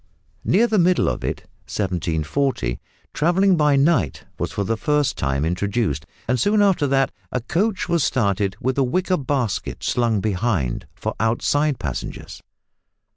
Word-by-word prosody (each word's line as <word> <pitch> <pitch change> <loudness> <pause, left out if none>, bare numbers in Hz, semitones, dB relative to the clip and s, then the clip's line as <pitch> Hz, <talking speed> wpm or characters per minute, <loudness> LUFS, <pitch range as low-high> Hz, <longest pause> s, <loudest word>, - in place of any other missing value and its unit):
Near 225 +5 +4
the 220 -3 +2
middle 180 +1 +3
of - - -2
it - - -2 0.3
(1740) 85 - -1 0.3
travelling 180 +5 +3
by 150 -3 +3
night 135 - +2 0.2
was - - -2
for 100 - -2
the 115 +4 0
first 150 +3 +1
time 70 +2 -1
introduced, 90 - -1 0.2
and 125 -1 +1
soon 205 - +3
after 190 -7 +3
that 135 0 +2 0.2
a 125 - 0
coach 185 - -1
was 170 -3 +2
started 100 -6 +1
with 130 +2 -1
a - - +4
wicker 180 +8 +1
basket 130 -7 -2
slung 115 -4 +1
behind 95 - -1
for - - -3
outside 135 +6 +1
passengers! - - -6
130 Hz, 145 wpm, -22 LUFS, 100-155 Hz, 0.3 s, Near